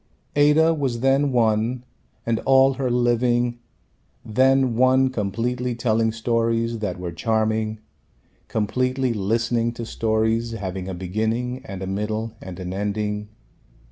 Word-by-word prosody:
Ada 150 +3 +5
was 135 -6 -2
then 135 +2 +3
one 115 +1 +1 0.4
and 115 -1 0
all 135 0 +4
her 130 -1 -2
living 120 0 +1 0.7
then 130 +2 +3
one 130 +2 +4
completely 120 +3 -2
telling 115 -1 +1
stories 115 0 0
that 105 -3 -3
were 90 -1 -4
charming, 110 +3 0 0.7
completely 125 +4 0
listening 115 +3 0
to 115 0 -6
stories 115 +1 0
having 95 -3 -5
a 95 - -4
beginning 110 +7 -2
and 95 -7 -6
a - - -3
middle 110 +3 -3
and 95 -1 -8
an 90 0 -5
ending. 105 +1 -2
115 Hz, 125 wpm, -23 LUFS, 110-125 Hz, 0.7 s, Ada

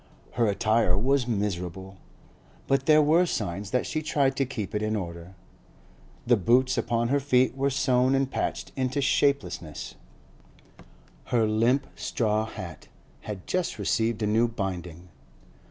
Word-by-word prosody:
Her 120 -2 +1
attire 105 -2 +2
was 130 +3 +1
miserable, 95 -3 -3 0.7
but 135 0 0
there 155 -1 +6
were 165 +4 +4
signs 100 - -3
that 125 +2 0
she 155 - -2
tried 140 -4 +1
to 135 - +1
keep 110 -7 -5
it 105 - -1
in 110 0 -1
order; 85 -1 -6 0.9
the 120 - +5
boots 125 +7 +3
upon 115 0 0
her 140 +2 +2
feet 130 -2 +2
were 135 +1 +1
sewn 130 -1 +2
and 135 0 0
patched - - -3
into 130 +1 -1
shapelessness; 135 - 0 1.3
her 115 -2 +2
limp 115 +6 +2
straw 110 -1 -1
hat 85 -8 -9 0.4
had 100 -3 -6
just 185 -1 -2
received 115 -1 0
a - - +2
new 110 +3 +3
binding. 90 -6 -5
115 Hz, 140 wpm, -26 LUFS, 100-135 Hz, 1.3 s, there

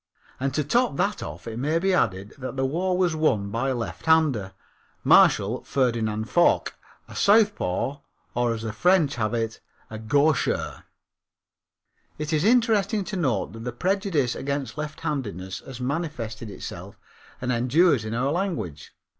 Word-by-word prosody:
And 135 +1 0
to 150 - +1
top 235 - +1
that - - 0
off 75 +3 -7
it 115 0 -5
may 150 +5 +1
be 190 +3 +1
added 100 - 0
that 130 0 -5
the 135 0 0
war 180 +6 0
was 180 -3 +2
won 110 -11 +1
by 120 +5 -1
a 130 - 0
lefthander, 125 -4 +1 0.5
Marshal - - +5
Ferdinand 115 -5 0
Foch, 175 +7 +3 0.3
a - - -12
southpaw, 200 - +2 0.4
or, 120 -1 +1
as 110 - -7
the 110 -2 -4
French 180 -3 +3
have 110 0 0
it, 115 -1 -2 0.5
gaucher. 145 +3 +1 1.3
It 150 +1 -3
is 155 0 +2
interesting 220 -3 +3
to 210 +1 -5
note 130 - -1
that 115 - -9
the 125 - -3
prejudice 180 - 0
against 140 -1 -3
lefthandedness 125 - -4
has 130 -2 -8
manifested 125 -6 -4
itself - - -8 0.4
and 125 0 -2
endures 130 +3 +3
in 110 +1 -4
our 130 +4 0
language. 165 - -3
135 Hz, 145 wpm, -25 LUFS, 115-170 Hz, 1.3 s, Marshal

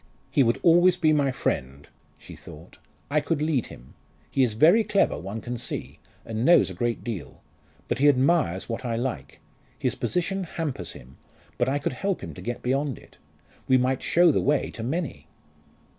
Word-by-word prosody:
"He - - +3
would 115 -2 +2
always 175 +1 +5
be 155 -3 +3
my 145 -2 +2
friend," 70 - -3 0.3
she - - -12
thought. - - -13 0.3
"I 150 +1 +3
could 165 -1 -1
lead 150 -5 0
him. 60 +2 -14 0.4
He 135 - +1
is 120 -5 +2
very 170 - +5
clever, 200 -2 +2
one 100 +7 -6
can 120 +2 -5
see, - - -5 0.3
and 110 0 -3
knows 175 +5 +5
a - - -6
great 120 -1 -2
deal. 105 - -6 0.5
But - - -2
he 145 +1 +6
admires 135 - +2
what 115 +2 -4
I 120 -2 -2
like. 125 +2 -4 0.4
His - - -1
position 190 +2 -2
hampers 150 - -4
him 65 +2 -14 0.4
but 120 - +2
I 140 - +1
could 140 - -2
help 195 +8 -2
him - - -7
to - - -10
get 120 0 -5
beyond 135 +1 -1
it. - - -18 0.5
We 130 - +5
might 130 +1 0
show 175 0 +4
the - - +1
way 145 0 +1
to 115 - -8
many!" 150 +6 -4
130 Hz, 190 wpm, -25 LUFS, 115-160 Hz, 0.5 s, he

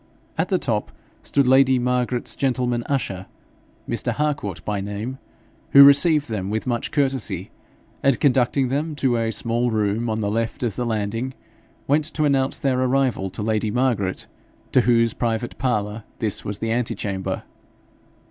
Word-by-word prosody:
At - - -1
the - - +2
top - - -2 0.3
stood 140 -1 +1
lady 130 0 +5
Margaret's 125 0 0
gentleman 125 -3 0
usher, 95 -9 -2 0.6
Mr. - - 0
Harcourt 120 - -2
by 105 -2 -2
name, 105 +6 -5 0.5
who 140 - +11
received 145 +2 +6
them 100 -5 -3
with 110 +1 -2
much 120 -2 -2
courtesy, 135 -4 -1 0.5
and 135 -3 +2
conducting 130 -1 +2
them 150 +4 -2
to 130 -4 +1
a 115 -1 0
small 115 +3 0
room 110 +1 0
on 110 0 -1
the 105 -1 -1
left 115 +3 -2
of 115 -5 -1
the 125 - -2
landing, 115 +4 -2 0.5
went 150 +2 +2
to 155 - +1
announce 135 -2 +1
their 130 -2 0
arrival 130 -6 +1
to 105 - -6
lady 110 0 0
Margaret, 115 -6 0 0.5
to 130 - +5
whose 115 -1 +3
private 115 0 -2
parlour 105 -4 -1
this 110 -2 -2
was 105 0 -4
the 115 +1 -2
antechamber. 105 -5 -2
120 Hz, 155 wpm, -22 LUFS, 110-130 Hz, 0.6 s, who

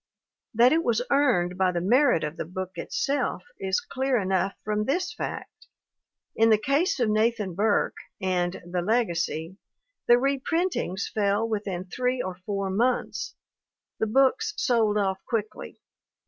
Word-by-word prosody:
That 245 +5 +6
it 330 +1 +2
was 235 -3 +1
earned 210 -11 +2
by 185 -1 +3
the 175 - -1
merit 245 - +3
of 150 +1 -3
the - - -4
book 185 +2 -5
itself 285 - -2 0.2
is 190 0 0
clear 265 0 -1
enough 190 0 0
from 210 0 -1
this 350 +7 -1
fact: - - -7 0.7
In 225 0 +4
the 215 - +6
case 285 - +1
of 240 - +2
Nathan 215 -2 +1
Burke 205 +4 +1 0.2
and 180 -2 -1
The 175 0 -2
Legacy 175 -5 -1 0.5
the 240 - +8
reprintings 275 - -1
fell 205 +1 +1
within 200 -5 -3
three 250 +7 -1
or 185 -5 -4
four 195 -2 -2
months; 240 +6 -1 0.6
the 220 - +1
books 270 - +2
sold 220 -4 +2
off 190 -2 -1
quickly. 215 -3 -4
215 Hz, 145 wpm, -26 LUFS, 190-255 Hz, 0.7 s, the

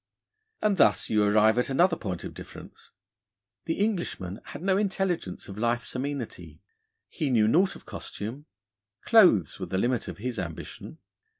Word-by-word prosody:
And 210 -2 +2
thus - - +3
you 105 -1 +4
arrive 110 +2 +4
at 125 - 0
another 170 +6 +3
point 95 - -5
of - - -7
difference. - - -12 0.8
The 165 - -1
Englishman 175 - -2
had - - -9
no 190 0 +3
intelligence 190 - -1
of 100 +1 -8
life's 120 +1 -1
amenity. 125 - -5 0.5
He 150 - -3
knew 110 -4 +4
naught 180 - +3
of - - -14
costume: 120 +9 -7 0.6
clothes 180 - +5
were - - -4
the 95 - -2
limit 120 +4 0
of - - -6
his 120 +1 -4
ambition. 85 - -7
125 Hz, 155 wpm, -27 LUFS, 105-175 Hz, 0.8 s, clothes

